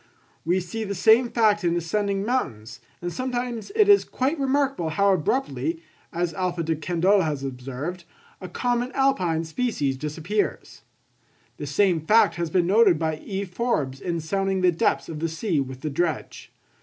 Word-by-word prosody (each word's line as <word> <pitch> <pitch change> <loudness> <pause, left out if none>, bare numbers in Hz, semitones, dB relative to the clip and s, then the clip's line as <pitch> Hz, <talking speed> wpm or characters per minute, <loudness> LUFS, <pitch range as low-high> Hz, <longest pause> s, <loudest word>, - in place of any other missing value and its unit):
We 175 +3 +1
see 185 +5 -5
the 200 -1 -4
same 225 +6 +5
fact 215 -4 +2
in 170 0 +1
ascending 200 +3 -1
mountains, 120 - -3 0.2
and 175 0 -3
sometimes 245 - -3
it 425 -2 +5
is 405 -1 +6
quite 280 +5 -2
remarkable 275 - 0
how 200 +5 +3
abruptly, 270 - -1 0.3
as 175 -1 -2
Alph. 185 -2 -2
De 160 0 0
Candolle 180 +5 +2
has 150 -5 -2
observed, 135 +7 -5 0.4
a 185 - -7
common 245 +5 -1
alpine 185 -12 +1
species 160 - -1
disappears. 160 +9 -3 0.8
The 145 - -6
same 175 +2 +2
fact 210 +2 +4
has 170 -1 -2
been 175 +1 +2
noticed 200 -2 +5
by 160 -1 -1
E. 195 +4 -4
Forbes 175 - -2
in 170 -2 -2
sounding 195 +3 -1
the 180 -1 +4
depths 165 - 0
of 155 -2 -6
the 165 +1 -1
sea 165 0 -1
with 130 -1 -5
the 155 - -2
dredge. 165 +2 -3
180 Hz, 165 wpm, -24 LUFS, 160-225 Hz, 0.8 s, is